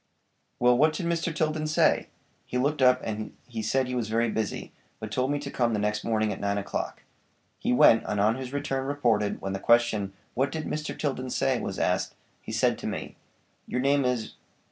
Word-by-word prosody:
'" -, -, -46 dB
"Well, 125 Hz, 0 st, +5 dB
what 155 Hz, +5 st, +4 dB
did 175 Hz, -, -3 dB
Mr. 170 Hz, 0 st, 0 dB
Tilden 155 Hz, -1 st, -1 dB
say?" 155 Hz, -, +3 dB, 0.4 s
"He 125 Hz, -, -2 dB
looked 140 Hz, +3 st, 0 dB
up 125 Hz, 0 st, +5 dB
and 110 Hz, -1 st, -5 dB, 0.2 s
said 130 Hz, +5 st, +1 dB
he 125 Hz, -, -4 dB
was 120 Hz, -3 st, -2 dB
busy, 110 Hz, -1 st, -1 dB, 0.3 s
but 110 Hz, -1 st, -6 dB
told 130 Hz, +4 st, 0 dB
me 145 Hz, -, +1 dB
to 140 Hz, -1 st, -6 dB
come 120 Hz, -2 st, +1 dB
the 105 Hz, -, 0 dB
next 105 Hz, 0 st, -1 dB
morning 110 Hz, -2 st, +1 dB
at -, -, -8 dB
nine 100 Hz, 0 st, 0 dB
o'clock." 100 Hz, -, -4 dB, 0.6 s
He -, -, 0 dB
went, 115 Hz, -2 st, +6 dB
and 105 Hz, -, -1 dB
on 105 Hz, +2 st, +4 dB
his 130 Hz, +1 st, -6 dB
return 135 Hz, -2 st, -2 dB
reported, 115 Hz, -8 st, +1 dB
when 95 Hz, 0 st, -3 dB
the 95 Hz, -, -3 dB
question: 110 Hz, -4 st, +3 dB, 0.2 s
"What 135 Hz, +3 st, 0 dB
did 155 Hz, +1 st, -4 dB
Mr. 150 Hz, 0 st, -4 dB
Tilden 130 Hz, -3 st, -2 dB
say"? -, -, +1 dB
was -, -, -4 dB
asked. -, -, 0 dB, 0.3 s
"He -, -, -8 dB
said -, -, +1 dB
to -, -, -4 dB
me, -, -, -5 dB, 0.5 s
'Your 125 Hz, -, -2 dB
name 140 Hz, +2 st, +3 dB
is 125 Hz, -3 st, -1 dB
125 Hz, 205 wpm, -27 LUFS, 110-140 Hz, 0.6 s, went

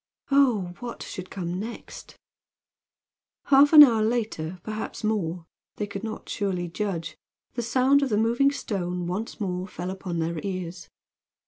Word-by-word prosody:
Oh, 240 Hz, -11 st, +3 dB
what 240 Hz, -1 st, -6 dB
should 185 Hz, 0 st, -7 dB
come 180 Hz, -1 st, -4 dB
next? 225 Hz, +3 st, -8 dB, 1.3 s
Half 280 Hz, +1 st, +7 dB
an 305 Hz, -2 st, +12 dB
hour 230 Hz, -6 st, +4 dB
later, 215 Hz, -7 st, -1 dB
perhaps 215 Hz, 0 st, -5 dB
more 180 Hz, -6 st, -1 dB, 0.3 s
they 210 Hz, -, -2 dB
could 200 Hz, 0 st, -7 dB
not 220 Hz, -1 st, -6 dB
surely 185 Hz, -4 st, -2 dB
judge 170 Hz, -2 st, -3 dB, 0.4 s
the 240 Hz, -, -2 dB
sound 260 Hz, +4 st, +3 dB
of 275 Hz, -, 0 dB
the 210 Hz, -, +1 dB
moving 235 Hz, +6 st, +3 dB
stone 180 Hz, -9 st, -3 dB
once 195 Hz, +8 st, -4 dB
more 185 Hz, -2 st, -2 dB
fell 180 Hz, 0 st, -5 dB
upon 185 Hz, -2 st, -5 dB
their 165 Hz, 0 st, -1 dB
ears. 185 Hz, -2 st, -5 dB
200 Hz, 145 wpm, -26 LUFS, 180-235 Hz, 1.3 s, an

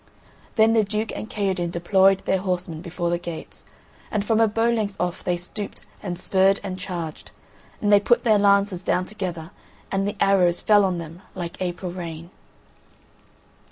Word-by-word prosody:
Then 220 Hz, 0 st, +5 dB
the 225 Hz, -1 st, +4 dB
Duke 215 Hz, +2 st, -2 dB
and 215 Hz, -, -6 dB
Kaherdin 190 Hz, -4 st, -1 dB
deployed 190 Hz, +3 st, +3 dB
their 190 Hz, -, +2 dB
horsemen 180 Hz, -4 st, -2 dB
before 175 Hz, -1 st, -3 dB
the 175 Hz, -, 0 dB
gates, 170 Hz, -2 st, -8 dB, 0.5 s
and 210 Hz, -1 st, -1 dB
from 225 Hz, 0 st, +2 dB
a 225 Hz, -, +5 dB
bow 225 Hz, +2 st, +1 dB
length 215 Hz, -4 st, -1 dB
off 175 Hz, -1 st, -2 dB
they 180 Hz, -1 st, 0 dB
stooped, 200 Hz, +4 st, -6 dB, 0.2 s
and 180 Hz, -3 st, -4 dB
spurred 190 Hz, +1 st, +3 dB
and 190 Hz, -2 st, -5 dB
charged, 175 Hz, -5 st, -5 dB, 0.5 s
and 205 Hz, -1 st, +2 dB
they 205 Hz, -, +8 dB
put 240 Hz, +4 st, +2 dB
their 215 Hz, -4 st, +4 dB
lances 200 Hz, -2 st, +3 dB
down 180 Hz, 0 st, +1 dB
together 180 Hz, -5 st, -5 dB, 0.4 s
and 195 Hz, 0 st, 0 dB
the 205 Hz, 0 st, -3 dB
arrows 185 Hz, -3 st, +4 dB
fell 205 Hz, -2 st, +5 dB
on 185 Hz, -2 st, 0 dB
them 165 Hz, +1 st, -8 dB
like 175 Hz, -1 st, -6 dB
April 180 Hz, 0 st, -3 dB
rain. 170 Hz, -1 st, -7 dB
190 Hz, 170 wpm, -24 LUFS, 175-205 Hz, 0.5 s, they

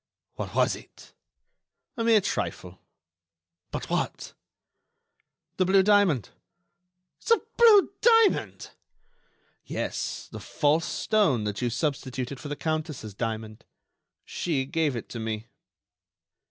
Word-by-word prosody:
"What -, -, -6 dB
was -, -, +3 dB
it?" -, -, -16 dB, 0.8 s
"A 230 Hz, -, -2 dB
mere 225 Hz, -2 st, +5 dB
trifle." 90 Hz, -, -4 dB, 0.9 s
"But -, -, -5 dB
what?" -, -, -3 dB, 1.2 s
"The 185 Hz, -, +3 dB
blue 190 Hz, +1 st, +5 dB
diamond." 200 Hz, -, +3 dB, 1.0 s
"The 460 Hz, -1 st, +5 dB, 0.2 s
blue 430 Hz, -4 st, +6 dB
diamond!" 455 Hz, -2 st, +3 dB, 0.9 s
"Yes, -, -, -4 dB
the -, -, -7 dB
false 155 Hz, +2 st, +1 dB
stone 195 Hz, -, +1 dB
that 105 Hz, +1 st, -3 dB
you 120 Hz, -, +1 dB
substituted 130 Hz, 0 st, -3 dB
for 135 Hz, -, -8 dB
the 145 Hz, -, -4 dB
Countess' 155 Hz, -, -3 dB
diamond. 110 Hz, 0 st, -5 dB, 0.6 s
She 145 Hz, -6 st, -2 dB
gave 150 Hz, -1 st, 0 dB
it 115 Hz, -, -6 dB
to 120 Hz, -, -6 dB
me." 110 Hz, -1 st, -4 dB
145 Hz, 110 wpm, -26 LUFS, -, 1.2 s, blue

